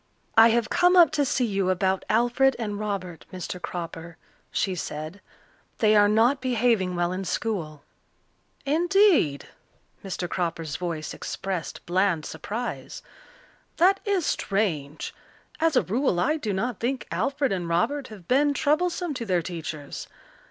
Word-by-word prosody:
"I 225 +1 +9
have 230 -1 +1
come 355 +1 +4
up 340 -5 +7
to 295 -2 +1
see 255 -2 +1
you 195 -4 0
about 190 +1 +1
Alfred 240 +4 +3
and 210 -3 -3
Robert, 195 -5 -4
Mr. 180 0 -6
Cropper," 170 -1 -6 0.3
she 190 - 0
said. 155 +1 -6 0.6
"They 215 -1 +4
are 205 0 +6
not 235 +6 +3
behaving 230 -7 +1
well 175 0 0
in 185 +1 -3
school." 170 -6 -3 0.8
"Indeed!" 335 - +3 0.5
Mr. 185 -2 -4
Cropper's 165 -4 -3
voice 165 -3 -4
expressed 190 -4 -5
bland 180 -2 +1
surprise. 235 +4 -5 0.7
"That 385 +3 +4
is 395 -5 0
strange. 165 -8 -1 0.5
As 325 -2 +2
a 250 - +4
rule 225 -2 0
I 300 - +2
do 220 -9 -3
not 210 +4 -2
think 255 +2 -2
Alfred 275 0 0
and 175 -3 -2
Robert 255 +12 0
have 200 -6 -12
been 285 +2 +3
troublesome 335 +3 +1
to 250 -4 -5
their 180 -3 +1
teachers. 160 -4 -6
205 Hz, 140 wpm, -26 LUFS, 175-270 Hz, 0.8 s, I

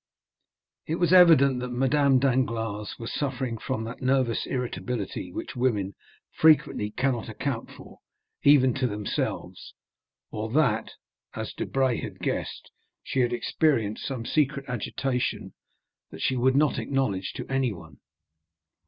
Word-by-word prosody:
It 160 - 0
was 175 0 +2
evident 155 -8 +7
that 125 0 -4
Madame 135 +2 +3
Danglars 115 -5 0
was 115 0 -6
suffering 130 -5 -2
from 130 -2 -3
that 115 +3 -7
nervous 130 -3 +1
irritability 125 -6 -4
which - - -6
women 105 -6 0 0.4
frequently 155 -9 +3
cannot 125 0 -1
account 115 +2 -3
for - - -14 0.4
even 135 -3 +5
to 135 -2 0
themselves; 105 -2 -4 0.6
or 110 +1 -4
that, 125 -8 +1 0.4
as - - -5
Debray 130 -3 0
had - - -7
guessed, - - -4 0.3
she 135 - -2
had 120 -1 +2
experienced 120 -3 0
some 125 -4 -4
secret 140 -1 0
agitation 125 +1 -2 0.6
that 80 - -8
she 130 - +1
would 130 +1 +2
not 150 0 +3
acknowledge 105 -9 -1
to - - -6
anyone. 105 - -3
125 Hz, 125 wpm, -26 LUFS, 115-135 Hz, 0.6 s, evident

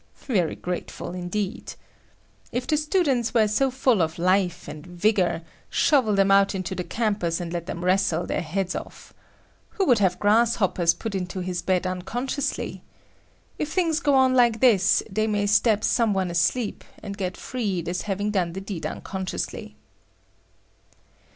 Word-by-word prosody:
Very 185 - 0
grateful, 175 -1 -5
indeed. 185 +5 -4 0.8
If 245 +1 -2
the 305 - +1
students 295 - +1
were 220 -2 +5
so 240 +6 +2
full 255 -5 +2
of 160 0 -1
life 185 0 +1
and 150 -1 -8
vigor, 180 -1 0 0.3
shovel 255 -9 +3
them 195 0 +3
out 195 0 +4
into 190 0 -3
the 180 - -3
campus 200 -6 -1
and 175 -1 -5
let 170 -1 -4
them 175 - -5
wrestle 180 -2 +2
their - - -2
heads 180 +3 -2
off. - - -8 0.6
Who 390 - +2
would 245 -8 +4
have 185 -3 +2
grasshoppers 205 -5 +3
put 225 -3 -5
into 185 0 -3
his 180 -1 -3
bed 185 0 0
unconsciously! 240 +10 -3 0.8
If 305 0 -2
things 330 -4 +1
go 285 -4 +2
on 260 -1 +4
like 240 -3 +4
this, 200 -6 +4
they 215 +3 -1
may 205 -1 0
stab 210 +1 +3
some 225 -4 +2
one 185 -2 0
asleep, 175 +7 0 0.2
and 200 -1 -5
get 185 -2 -4
freed 195 -9 -3
as 180 +1 -2
having 205 +1 -2
done 180 -5 0
the 190 - -5
deed 195 -4 -5
unconsciously. 190 -2 -5
195 Hz, 155 wpm, -24 LUFS, 180-235 Hz, 0.8 s, were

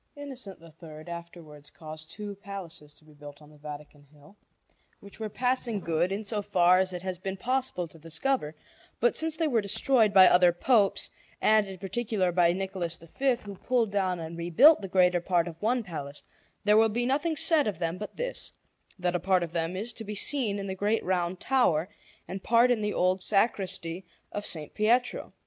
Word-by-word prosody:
Innocent 265 -9 -7
III 160 -1 -13
afterwards 165 -4 -10
caused 155 0 -9
two 210 -1 -6
palaces 190 -7 -9
to 155 - -20
be 155 - -18
built 145 -1 -12
on 150 0 -17
the 150 - -19
Vatican 150 0 -10
Hill, 150 +6 -19 0.6
which 200 +2 -14
were 220 -1 -3
passing 250 -1 -1
good, 170 +1 0
in 200 +3 -3
so 210 0 -1
far 185 -3 +4
as 190 0 0
it 180 0 -6
has 185 -2 -4
been 190 +1 -4
possible 250 -5 -2
to 165 +1 -17
discover; 165 - -2 0.4
but 240 - +2
since 320 -1 -1
they 325 -1 +1
were 240 -6 +2
destroyed 220 +2 +2
by 190 -2 +8
other 180 0 +6
Popes, 200 +3 +1 0.3
and 215 -1 +4
in 190 -1 -8
particular 195 0 -1
by 170 -1 +4
Nicholas 185 -2 -3
V, 255 +11 -1
who 200 - -7
pulled 230 +2 0
down 190 -3 0
and 165 +1 -7
rebuilt 210 - +6
the 195 - -5
greater 180 -1 +3
part 175 -1 +1
of 165 -1 -9
one 240 +3 +1
palace, 145 -6 -7 0.4
there 210 +1 +4
will 225 0 +5
be 240 +3 -1
nothing 295 +5 0
said 310 -3 +4
of 205 - -2
them 170 +1 -3
but 210 - -8
this, - - -4 0.5
that 180 -1 -1
a - - +1
part 185 0 +2
of 165 - -5
them 165 +1 -2
is 220 +5 -3
to 225 - -8
be 210 0 -6
seen 220 -2 +1
in 200 - -4
the 190 - -3
great 205 +4 0
Round 180 -1 -1
Tower 185 -12 +2 0.4
and 190 +1 -6
part 235 +4 +4
in 235 -3 +1
the 210 0 -1
old 185 +1 +1
sacristy 190 -4 -1 0.2
of 205 0 -5
S. - - -1 0.2
Pietro. 235 +4 +1
190 Hz, 200 wpm, -28 LUFS, 170-220 Hz, 0.6 s, by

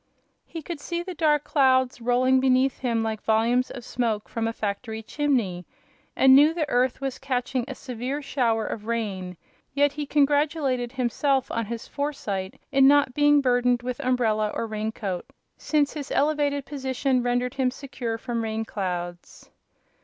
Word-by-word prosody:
He 325 -2 -7
could 340 -1 -6
see 340 +4 -3
the 370 +1 -6
dark 300 -3 +2
clouds 260 -4 +2
rolling 255 +2 +3
beneath 260 0 +2
him 230 -3 0
like 220 -1 -3
volumes 230 +3 +2
of 245 -2 -8
smoke 225 -5 -2
from 225 -1 -2
a - - 0
factory 220 +1 -4
chimney, 230 -11 -1 0.5
and 265 0 +6
knew 300 +4 +6
the 315 -4 -1
earth 250 +2 +1
was 270 -2 -3
catching 255 -2 -2
a 265 - -6
severe 255 +2 -4
shower 235 -6 0
of 215 0 -6
rain; 195 -6 -3 0.4
yet 285 0 +3
he 290 0 -5
congratulated 285 -4 +1
himself 265 +1 0
on 230 -2 -2
his 230 0 -6
foresight 205 -10 -4
in 270 0 +6
not 285 -2 +4
being 290 +1 +4
burdened 245 -1 +2
with 250 +1 -4
umbrella 235 -5 +1
or - - -2
raincoat, 215 -4 -4 0.3
since 295 -2 0
his 290 -2 -6
elevated 285 -1 +1
position 265 -2 -1
rendered 245 0 0
him 260 -2 +1
secure 250 -3 -5
from 235 0 -3
rain 220 0 -2
clouds. 175 -4 -5
250 Hz, 160 wpm, -25 LUFS, 225-280 Hz, 0.5 s, and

